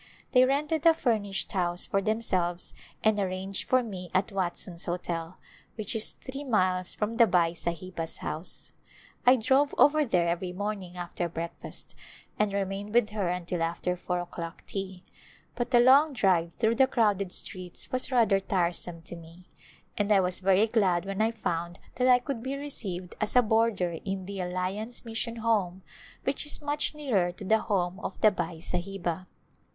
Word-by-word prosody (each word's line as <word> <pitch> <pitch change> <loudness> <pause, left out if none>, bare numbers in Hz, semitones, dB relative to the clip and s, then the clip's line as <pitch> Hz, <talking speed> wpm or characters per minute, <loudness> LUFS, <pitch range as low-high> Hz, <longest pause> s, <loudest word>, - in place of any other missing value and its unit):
They 255 0 +6
rented 295 +3 0
a 325 - +7
furnished 215 -9 -1
house 175 -3 +1
for 195 - 0
themselves 185 -5 0 0.3
and 215 -1 +3
arranged 190 0 -2
for 255 -1 +4
me 185 -6 -7
at 190 +3 +2
Watson's 180 -2 -3
Hotel, 170 -1 -4 0.4
which 215 +1 -2
is 220 - +2
three 275 +2 -8
miles 185 -7 +1
from 220 +2 -2
the 230 -1 +7
Bai 175 -3 +3
Sahiba's 170 0 -4
house. 160 +4 -6 0.5
I 250 - +9
drove 265 +4 +2
over 305 +1 +5
there 175 -9 +2
ever)^ 180 0 -6
morning 195 -3 -4
after 175 0 -3
breakfast 165 +1 -6 0.5
and 210 -1 +2
remained 200 +2 -3
with 240 -3 +4
her 205 -4 -1
until 175 -1 -2
after 170 +2 -1
four 180 0 -2
o'clock 170 -1 -7
tea, 190 -2 -5 0.5
but 240 0 -2
the 245 -2 +5
long 275 +5 +6
drive 185 -8 +2
through 225 0 +2
the 265 0 +6
crowded 205 -6 +1
streets 180 -1 -4
was 255 +1 +2
rather 225 -6 +4
tiresome 175 -3 -1
to 175 - -5
me 170 +2 -14 0.5
and 205 0 +1
I 200 - +6
was 180 -1 +1
very 195 +2 +4
glad 195 -6 +2
when 195 +1 -2
I 220 - +3
found 175 -6 -3 0.2
that 250 +1 +3
I 250 -1 +7
could 245 -1 -4
be 265 +3 -3
received 200 -11 -4
as 215 - +1
a 250 - +7
boarder 215 -7 +1
in 195 -1 -3
the 195 0 -6
Alliance 185 +7 -3
Mission 230 +1 -3
Home 205 -5 0 0.4
which 270 +1 -1
is - - +2
much 295 +1 -1
nearer 220 -12 +1
to 195 - -9
the 220 +3 +4
home 185 -3 -1
of - - -6
the 215 - +7
Bai 175 -3 -3
Sahiba. 180 0 -3
195 Hz, 170 wpm, -28 LUFS, 180-230 Hz, 0.5 s, I